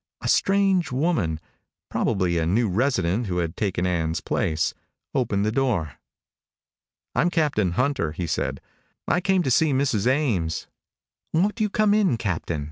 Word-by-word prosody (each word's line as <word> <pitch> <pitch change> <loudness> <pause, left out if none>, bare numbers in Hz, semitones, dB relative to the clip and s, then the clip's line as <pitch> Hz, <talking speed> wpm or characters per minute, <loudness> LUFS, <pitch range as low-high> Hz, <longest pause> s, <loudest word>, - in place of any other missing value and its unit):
A - - -3
strange 195 -4 +2
woman 125 - 0 0.5
probably 90 -5 0
a 80 - 0
new 110 +7 +2
resident 105 -1 0
who 90 -2 -2
had 85 -2 -2
taken 95 -3 -1
Ann's 80 -3 0
place 80 0 -1 0.4
opened 105 -7 0
the 110 - +1
door. 110 - -1 1.1
"I'm 175 - +2
Captain 145 - +1
Hunter," 130 - 0
he 85 +3 -4
said. 80 - -2 0.5
"I 180 - +2
came 190 -1 +2
to 130 - 0
see 155 +3 +3
Mrs. 125 -5 +1
Ames." 110 - 0 0.7
"Won't 205 +7 +1
you 210 - +2
come 210 0 +2
in, 200 - +3
Captain?" 85 -6 -2
115 Hz, 145 wpm, -24 LUFS, -, 1.1 s, see